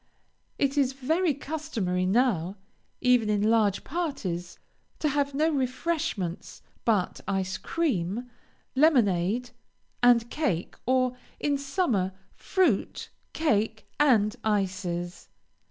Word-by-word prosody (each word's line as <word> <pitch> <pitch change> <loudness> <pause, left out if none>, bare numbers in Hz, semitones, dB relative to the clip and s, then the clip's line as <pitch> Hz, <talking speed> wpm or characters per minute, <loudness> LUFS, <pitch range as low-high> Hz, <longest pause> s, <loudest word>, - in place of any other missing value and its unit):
It 280 +1 +1
is 265 -1 +2
very 310 +4 +1
customary 235 - -2
now, 195 -5 +2 0.5
even 250 -4 +4
in 205 -1 +1
large 210 -4 +2
parties, 215 - -3 0.4
to 305 - 0
have 285 -1 0
no 310 +3 +2
refreshments 260 - -2 0.2
but 210 -6 +1
ice 195 0 -1
cream, 230 - -1 0.5
lemonade, 240 - +3 0.5
and 240 -1 +5
cake, 240 - -1
or, 255 -1 +2 0.2
in 290 -1 +1
summer, 275 - 0 0.2
fruit, 350 - 0 0.2
cake, 220 -8 0
and 225 -8 +4
ices. 185 -4 -2
245 Hz, 100 wpm, -27 LUFS, 195-285 Hz, 0.5 s, and